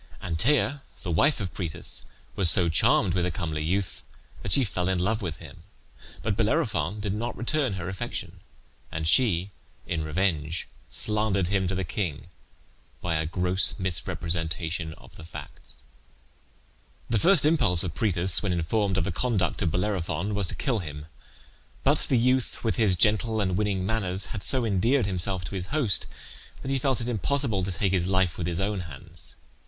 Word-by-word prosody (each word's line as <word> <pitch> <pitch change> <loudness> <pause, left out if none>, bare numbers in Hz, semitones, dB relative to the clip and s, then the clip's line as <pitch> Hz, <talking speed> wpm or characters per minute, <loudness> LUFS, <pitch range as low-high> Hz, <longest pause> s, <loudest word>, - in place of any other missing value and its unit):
Antea, 135 - +1 0.2
the 90 - -3
wife 140 - +3
of 95 -4 -4
Proetus, 85 -5 -2 0.3
was 95 -4 +5
so 85 +1 +5
charmed 85 +2 +3
with 90 -1 +1
the 90 - +1
comely 80 -2 -3
youth 95 +3 -1 0.4
that - - -4
she 140 - +6
fell 90 -4 -1
in 95 - +1
love 105 +6 0
with 85 -6 -3
him; 80 0 -12 0.6
but 110 -2 0
Bellerophon 105 - 0
did 100 -1 -2
not 115 +3 -3
return 130 -1 0
her 90 -2 -5
affection, 95 -1 -5 0.5
and 80 0 -2
she, 100 -3 +3 0.3
in 80 -2 -2
revenge, 80 -1 -1 0.2
slandered 105 0 0
him 95 -2 +1
to 95 - -2
the 95 - -1
king 85 -3 -3 0.7
by 90 - -2
a 80 0 0
gross 90 +2 +1
misrepresentation 80 -2 -2
of - - -17
the - - -10
facts. 75 -4 -11 1.3
The 115 - +1
first 175 -4 +5
impulse 125 - +4
of 90 -4 -3
Proetus, 95 -3 +2
when 100 - -1
informed 95 +3 0
of 95 - +2
the 95 - -2
conduct 100 -2 0
of 90 - +2
Bellerophon, 90 +1 -1
was 100 -2 0
to - - -3
kill 125 -5 0
him; 75 -4 -7 0.8
but - - +3
the 130 - +4
youth, 125 +1 +1
with 115 +1 0
his 105 -6 +3
gentle 110 +3 +2
and 95 -3 0
winning 100 -2 0
manners, 95 -3 0
had 105 - -4
so 130 0 +2
endeared 115 +5 +2
himself 95 -1 -1
to 85 - -7
his 90 -1 -4
host 140 - +2 0.6
that 135 - -3
he 135 - +1
felt 130 -2 +1
it 115 - -3
impossible 120 -2 0
to 95 - -2
take 95 +2 0
his 90 -2 +1
life 95 -2 +1
with 85 - -2
his 85 0 -2
own 100 0 -1
hands. 85 0 -2
95 Hz, 175 wpm, -27 LUFS, 85-110 Hz, 1.3 s, she